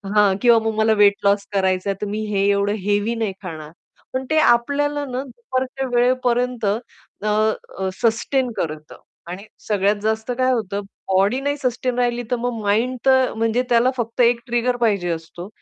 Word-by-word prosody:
हां. 205 -2 +4
किंवा 235 -2 +6
"मग 220 - 0
मला 220 0 +3
वेट 200 0 +7
लॉस 200 0 +3
करायचाय 190 0 +1
तर 210 - -2
मी 210 +2 -3
हे 195 -1 +1
एवढं 200 +1 +1
हेवी 205 +3 0
नाही 220 -4 -2
खाणार." 155 -3 -7 0.4
पण 260 0 -2
ते 315 - +3
आपल्याला 285 +3 +2
ना 255 0 -4
दुपारच्या 260 +1 -4
वेळेपर्यंत 250 -1 +1
अ, 200 +2 +2 1.0
अ, 190 0 -1
सस्टेन 240 +3 +1
करतं 155 -1 -5 0.3
आणि 190 +3 -7 0.2
सगळ्यात 205 0 +2
जास्त 220 +2 -1
काय 255 0 +3
होतं, 205 -3 -2 0.3
बॉडी 200 +7 +3
नाही 285 +1 -1
सस्टेन 250 0 -1
राहिली 240 0 0
तर - - +3
मग 235 -3 -2
माइंड 225 +5 +1
तर 260 -1 +4
म्हणजे 225 +2 +1
त्याला 240 +1 +4
फक्त 235 +1 -2
एक 235 0 +4
ट्रिगर 240 +1 0
पाहिजे 200 -5 0
असतो. 165 +2 -7
230 Hz, 170 wpm, -21 LUFS, 200-250 Hz, 1.0 s, वेट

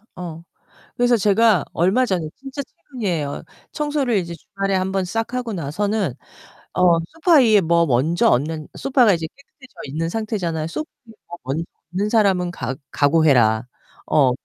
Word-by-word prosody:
어. 170 -2 -7 0.5
그래서 245 0 +3
제가 205 -3 +3
얼마 195 +10 +2
전에 175 -6 -1
진짜 275 +1 -6
최근이에요. 185 - -4 0.3
청소를 290 -6 0
이제 170 -2 -4
주말에 195 +1 -3
한번 190 0 0
싹 225 +6 -3
하고 245 -3 -3
나서는 190 - -1 0.6
어 175 -2 +4
소파 330 +1 +2
위에 215 -5 +5
뭐 170 0 +3
먼저 150 +6 +2
얹는 150 +4 0
소파가 255 -6 +3
이제 165 -2 -2
깨끗해져 280 -1 -20
있는 160 +4 -3
상태잖아요. 180 -7 -2
"소파 310 - -5 0.2
위에 225 - -14
뭐 175 0 -8 0.6
얹는 205 +2 0
사람은 190 -6 +2
각 130 -3 -5
각오해라." 130 -7 +3 0.4
어. 135 -4 +4
185 Hz, 310 characters per minute, -21 LUFS, 160-225 Hz, 0.6 s, 위에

